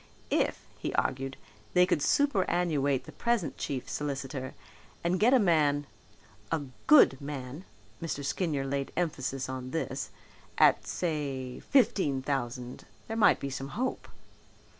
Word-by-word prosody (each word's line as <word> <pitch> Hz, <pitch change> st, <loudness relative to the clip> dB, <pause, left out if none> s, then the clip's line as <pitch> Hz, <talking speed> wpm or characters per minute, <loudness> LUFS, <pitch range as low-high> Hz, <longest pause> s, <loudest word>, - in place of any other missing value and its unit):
If, -, -, 0 dB
he -, -, -2 dB
argued, 135 Hz, +1 st, -1 dB, 0.4 s
they 180 Hz, 0 st, +7 dB
could 180 Hz, -, +1 dB
superannuate 175 Hz, -, +2 dB
the -, -, -11 dB
present 235 Hz, -8 st, 0 dB
chief 130 Hz, -3 st, -3 dB
solicitor 135 Hz, -2 st, -4 dB, 0.5 s
and 175 Hz, +2 st, +1 dB
get 230 Hz, +4 st, +5 dB
a 265 Hz, -, +7 dB
man, 150 Hz, -, +3 dB, 0.7 s
a 160 Hz, -3 st, 0 dB, 0.2 s
good 265 Hz, -, +7 dB
man 140 Hz, +3 st, -6 dB, 0.4 s
(Mr. 150 Hz, -4 st, -3 dB
Skinyer 145 Hz, -3 st, -1 dB
laid 140 Hz, 0 st, -2 dB
emphasis 135 Hz, -6 st, -1 dB
on 130 Hz, -1 st, -5 dB
this) 130 Hz, -5 st, -3 dB, 0.5 s
at, -, -, +5 dB
say, 140 Hz, -7 st, -3 dB
fifteen 185 Hz, -, +2 dB
thousand 125 Hz, -2 st, -3 dB, 0.2 s
there 225 Hz, -, -3 dB
might 225 Hz, -, +5 dB
be 140 Hz, -, -4 dB
some 135 Hz, +1 st, -4 dB
hope. 255 Hz, +2 st, -2 dB
145 Hz, 130 wpm, -30 LUFS, 135-175 Hz, 0.7 s, they